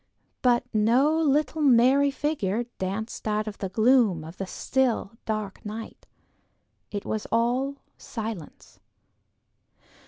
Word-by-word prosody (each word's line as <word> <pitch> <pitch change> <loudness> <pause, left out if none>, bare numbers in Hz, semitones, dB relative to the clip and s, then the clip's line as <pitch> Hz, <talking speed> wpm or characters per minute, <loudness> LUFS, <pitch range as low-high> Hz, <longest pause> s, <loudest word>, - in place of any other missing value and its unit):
But 240 -2 +3
no 240 +8 +3
little 310 0 +1
merry 270 +1 +5
figure 270 -7 -1 0.2
danced 200 +5 -4
out 215 0 0
of 210 - -6
the 195 - -3
gloom 220 -4 +3
of 160 +3 -10
the 195 - -4
still, 250 -2 0
dark 215 -3 -3
night; 215 +2 -8 0.8
it 205 -1 -5
was 215 -1 -3
all 245 +4 +1 0.2
silence. 220 -8 -7
225 Hz, 115 wpm, -26 LUFS, 210-265 Hz, 0.8 s, merry